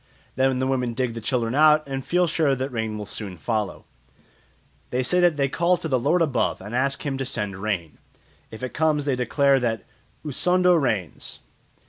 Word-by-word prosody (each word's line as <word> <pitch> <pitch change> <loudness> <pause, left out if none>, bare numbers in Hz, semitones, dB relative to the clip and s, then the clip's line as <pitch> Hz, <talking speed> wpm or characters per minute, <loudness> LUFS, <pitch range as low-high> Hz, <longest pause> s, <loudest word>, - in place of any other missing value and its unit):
Then 130 0 +2
the 130 - 0
women 125 -3 -1
dig 125 -1 -1
the 115 - -6
children 115 0 -1
out 155 +1 +5
and 135 -1 -4
feel 180 +5 +2
sure 155 -4 +1
that 130 +1 -3
rain 110 -2 -3
will 105 - -5
soon 100 -3 -6
follow. 110 +3 -3 1.0
They 125 +1 0
say 180 +9 +2
that 175 -4 +3
they 140 -1 +2
call 175 +6 +1
to 165 - -5
"the 130 -4 +1
lord 165 +8 +2
above" 145 -5 0
and 105 +4 -9
ask 135 +3 0
him 135 -2 -2
to - - -1
send 105 -6 -3
rain. 90 -8 -3 0.5
If 110 +3 -10
it 130 - -4
comes 155 -2 +1
they 140 -3 +1
declare 135 +2 +2
that 115 -4 -1 0.4
"Usondo 180 +5 +3
rains." 110 - -2
130 Hz, 190 wpm, -24 LUFS, 115-150 Hz, 1.0 s, out